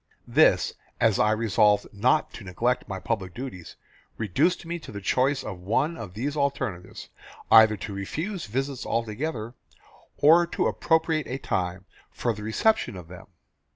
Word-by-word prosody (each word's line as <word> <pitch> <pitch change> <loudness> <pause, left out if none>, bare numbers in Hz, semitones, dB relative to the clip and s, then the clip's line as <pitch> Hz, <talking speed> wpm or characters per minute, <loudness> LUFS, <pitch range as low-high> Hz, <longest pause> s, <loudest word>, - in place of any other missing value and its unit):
This, - - +4 0.3
as 110 -3 +3
I 105 - +4
resolved 105 -1 +3
not 125 +9 +1
to 115 - -9
neglect 115 +7 -1
my 95 -2 -5
public 95 -1 -3
duties, 120 -10 -8 0.4
reduced 145 - 0
me 170 +1 -4
to - - -11
the 100 - -6
choice 130 +7 +1
of 95 -4 -6
one 130 - 0
of 100 - -9
these 140 +7 -3
alternatives: 135 -11 -3 0.4
either 110 -1 +7
to 100 +1 -6
refuse 160 - -4
visits 135 +4 -3
altogether, 115 +1 -3 0.6
or 165 +4 +6
to - - -1
appropriate 160 -1 +1
a 130 - -3
time 90 -6 -3 0.2
for 120 - -2
the 105 - -9
reception 120 - +1
of 90 -3 -10
them. 90 -1 -11
115 Hz, 155 wpm, -26 LUFS, 100-145 Hz, 0.6 s, either